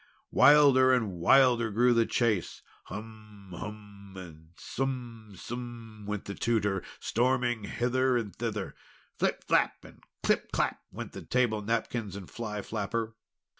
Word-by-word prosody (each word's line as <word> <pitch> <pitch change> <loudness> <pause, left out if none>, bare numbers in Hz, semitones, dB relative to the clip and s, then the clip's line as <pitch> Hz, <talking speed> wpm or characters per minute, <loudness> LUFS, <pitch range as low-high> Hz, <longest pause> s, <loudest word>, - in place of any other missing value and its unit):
Wilder 140 -3 +7
and 120 -6 +2
wilder 120 +3 +5
grew 120 +4 +3
the 115 -1 +3
chase. 110 -7 0 0.2
"Hum! 105 -2 -10
Hum!" 100 0 -9
and 80 -3 -11
"Sum! 120 -5 -5
Sum!" 115 -3 -8
went 105 -1 -3
the 100 - -5
Tutor, 105 -4 0 0.2
storming 120 -2 0
hither 125 +3 +1
and 110 -4 -4
thither. 105 -4 -3 0.5
"Flip! - - 0
Flap!" - - +1
and - - -15 0.2
"Clip! - - +1
Clap!" - - 0
went - - -7
the - - -8
table 120 -4 +1
napkins 115 -2 -2
and 100 -3 -9
fly 105 -3 -5
flapper. 115 +2 -3
115 Hz, 130 wpm, -29 LUFS, 105-120 Hz, 0.5 s, Wilder